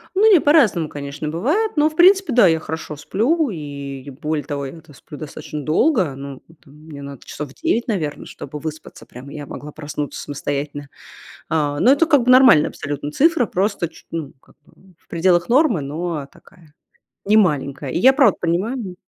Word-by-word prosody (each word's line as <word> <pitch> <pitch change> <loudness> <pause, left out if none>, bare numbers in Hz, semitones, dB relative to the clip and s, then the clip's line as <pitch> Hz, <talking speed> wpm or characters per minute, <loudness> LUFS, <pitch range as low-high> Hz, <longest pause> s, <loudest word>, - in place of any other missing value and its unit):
Ну 430 +2 +5
не, 365 - +7
по-разному, 235 - +3
конечно, 145 +1 -6
бывает, 305 - 0
но, 300 0 +3
в 310 - -15
принципе- 375 -2 +5
да, 235 -5 +6
я 160 -1 +2
хорошо 155 -1 -6
сплю, 245 - 0
и, 140 -4 -7
более 150 +1 -3
того, 140 -1 -4
я-то 155 +2 -11
сплю 145 +3 -12
достаточно 150 0 -7
долго. 170 - +1
Ну, 135 -1 -9 0.2
там, 140 -3 -19
мне 150 -1 -12
надо 140 -2 -10
часов 145 -2 -7
9, 285 -8 -1
наверно, 160 -10 -3
чтобы 150 - -8
выспаться 155 0 -8
прям, 125 +3 -12
и 145 - -10
я 145 -1 -6
могла 150 +1 -9
проснуться 145 -1 -6
самостоятельно. 145 0 -5 0.6
А, 145 -2 -1
но 255 - +6
это 300 +4 +3
как 290 -6 +4
бы 250 - +2
нормальная 255 - +7
абсолютно 145 0 -5
цифра, 285 - +3
просто 195 -2 -1
чу - - -18
ну, 160 -4 -5
как - - -24
бы 190 -1 -23
в - - -36
пределах 175 0 +2
нормы, 250 - +3
но 150 +1 -4
такая, 165 -6 -21 0.5
немаленькая. 150 -10 +1
И - - -1
я 260 +8 +6
правда 265 -8 +4
понимаю 185 +3 -2
160 Hz, 180 wpm, -20 LUFS, 145-240 Hz, 0.6 s, не